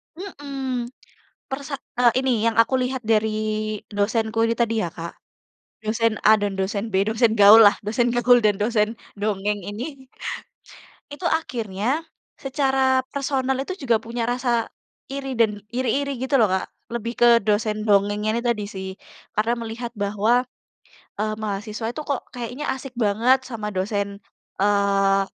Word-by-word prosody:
Mhm. 275 Hz, -9 st, -5 dB, 0.6 s
Persa 275 Hz, +1 st, -4 dB, 0.2 s
e -, -, +2 dB, 0.2 s
ini, 265 Hz, 0 st, +1 dB, 0.2 s
yang 230 Hz, -, 0 dB
aku 245 Hz, +3 st, 0 dB
lihat 255 Hz, 0 st, -2 dB
dari 220 Hz, 0 st, +3 dB, 0.6 s
dosenku 220 Hz, +2 st, 0 dB
ini 230 Hz, -, 0 dB
tadi 230 Hz, -1 st, +1 dB
ya, -, -, -1 dB
Kak. 170 Hz, 0 st, -6 dB, 0.7 s
Dosen 225 Hz, +1 st, +1 dB
A 215 Hz, -, +8 dB
dan 205 Hz, -1 st, -1 dB
Dosen 200 Hz, +3 st, -2 dB
B, -, -, +1 dB
dosen 225 Hz, 0 st, +3 dB
gaullah. 205 Hz, +1 st, +9 dB
Dosen 235 Hz, +3 st, +1 dB
gaul 245 Hz, +1 st, +5 dB
dan 210 Hz, -, +4 dB
dosen 210 Hz, -1 st, +2 dB, 0.3 s
dongeng 205 Hz, 0 st, -1 dB
ini 265 Hz, +5 st, -7 dB, 1.0 s
itu 340 Hz, +4 st, -3 dB
akhirnya, 250 Hz, 0 st, -1 dB, 0.3 s
secara 265 Hz, -1 st, +1 dB
personal 265 Hz, -2 st, -1 dB
itu 320 Hz, +8 st, -3 dB
juga 235 Hz, -4 st, +3 dB
punya 230 Hz, +1 st, -4 dB
rasa 240 Hz, -1 st, 0 dB, 0.4 s
iri 270 Hz, -2 st, -4 dB
dan, 220 Hz, -3 st, +2 dB
iri-iri 260 Hz, +4 st, -1 dB
gitu 270 Hz, +1 st, +2 dB
loh, 220 Hz, -, +5 dB
Kak. 190 Hz, 0 st, -2 dB, 0.2 s
Lebih 235 Hz, 0 st, -4 dB
ke 240 Hz, -, +7 dB
dosen 215 Hz, +1 st, 0 dB
dongeng 205 Hz, 0 st, +2 dB
ini 215 Hz, +2 st, +1 dB
tadi 235 Hz, -3 st, 0 dB
sih. 190 Hz, -2 st, -6 dB, 0.4 s
Karena 230 Hz, +3 st, +1 dB
melihat 230 Hz, +1 st, -5 dB
bahwa, 215 Hz, +3 st, +1 dB, 0.7 s
eee, 215 Hz, +1 st, -2 dB
mahasiswa 215 Hz, +1 st, -4 dB
itu 305 Hz, -, -4 dB
kok 280 Hz, -3 st, -3 dB
kayaknya 245 Hz, +4 st, -5 dB
asik 265 Hz, -2 st, -9 dB
banget 235 Hz, +5 st, +3 dB
sama 215 Hz, -4 st, -5 dB
dosen, 200 Hz, +1 st, -2 dB, 0.4 s
eee, 200 Hz, -1 st, +3 dB
230 Hz, 140 wpm, -23 LUFS, 210-260 Hz, 1.0 s, gaullah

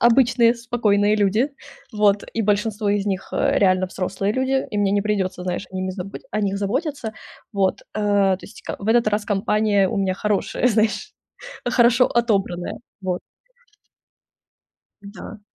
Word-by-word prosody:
обычные 235 Hz, 0 st, +4 dB
спокойные 215 Hz, -3 st, +1 dB
люди, 215 Hz, +7 st, +2 dB, 0.4 s
вот, 210 Hz, -1 st, +2 dB
и 225 Hz, -, 0 dB
большинство 210 Hz, 0 st, 0 dB
из 205 Hz, 0 st, 0 dB
них, 195 Hz, -2 st, -3 dB
э, -, -, +2 dB
реально 185 Hz, -1 st, +3 dB
взрослые 190 Hz, +2 st, -2 dB
люди, 265 Hz, +1 st, 0 dB
и 210 Hz, -, -4 dB
мне 205 Hz, -1 st, +2 dB
не 205 Hz, +1 st, +2 dB
придется, 195 Hz, -3 st, -1 dB
знаешь, 180 Hz, +1 st, -3 dB
ими 185 Hz, 0 st, -3 dB
забы 185 Hz, +1 st, -7 dB
о 210 Hz, -, -1 dB
них 200 Hz, 0 st, 0 dB
заботиться, 245 Hz, -, -2 dB, 0.4 s
вот, 195 Hz, -2 st, +1 dB
э. 215 Hz, -, -2 dB
То 200 Hz, -2 st, +2 dB
есть, -, -, -12 dB
ка -, -, -5 dB
в 200 Hz, -, -7 dB
этот 230 Hz, -1 st, +4 dB
раз 210 Hz, 0 st, 0 dB
компания 205 Hz, -1 st, +2 dB
у 225 Hz, -, -3 dB
меня 190 Hz, -1 st, +1 dB
хорошая, 210 Hz, +4 st, 0 dB
знаешь, 225 Hz, -, 0 dB, 0.5 s
хорошо 245 Hz, 0 st, +4 dB
отобранная, 195 Hz, -7 st, 0 dB, 0.2 s
вот. 185 Hz, -2 st, -2 dB, 1.8 s
Да. 205 Hz, +1 st, -10 dB
205 Hz, 150 wpm, -22 LUFS, 195-230 Hz, 1.8 s, обычные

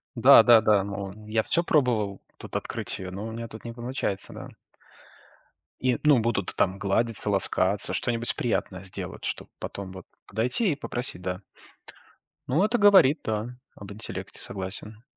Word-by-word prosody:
Да-да-да, 110 Hz, -4 st, +7 dB
мол, 100 Hz, -1 st, -5 dB, 0.2 s
я 110 Hz, 0 st, +1 dB
всё 170 Hz, -, +1 dB
пробовал 115 Hz, -11 st, +1 dB, 0.2 s
тут -, -, -10 dB
открыть -, -, -3 dB
её, 90 Hz, -1 st, -6 dB
но 100 Hz, +4 st, -5 dB
у -, -, -6 dB
меня 115 Hz, +1 st, -6 dB
тут 110 Hz, 0 st, -11 dB
не 115 Hz, -, -5 dB
получается, 120 Hz, -5 st, -4 dB
да. -, -, -9 dB, 1.3 s
И, 125 Hz, -2 st, +1 dB
ну, 145 Hz, -5 st, +6 dB
будут 110 Hz, -4 st, -1 dB
там 95 Hz, +1 st, +1 dB
гладиться, 105 Hz, +2 st, +1 dB
ласкаться, 100 Hz, -1 st, +1 dB
что-нибудь 120 Hz, -1 st, -1 dB
приятное 95 Hz, -6 st, -2 dB
сделать, 95 Hz, -, -6 dB
чтобы -, -, -4 dB
потом 95 Hz, -2 st, -6 dB
вот 95 Hz, -, -10 dB, 0.2 s
подойти, 125 Hz, -, +1 dB
и -, -, -5 dB
попросить, 125 Hz, -9 st, -4 dB
да. 90 Hz, +1 st, -4 dB, 1.1 s
Ну, 155 Hz, +10 st, +2 dB
это 230 Hz, +3 st, +2 dB
говорит, 190 Hz, -, +6 dB
да, 110 Hz, +3 st, -3 dB, 0.2 s
об 100 Hz, 0 st, -10 dB
интеллекте, 110 Hz, +2 st, -7 dB
согласен. 105 Hz, +3 st, -6 dB
110 Hz, 150 wpm, -26 LUFS, 100-125 Hz, 1.3 s, Да-да-да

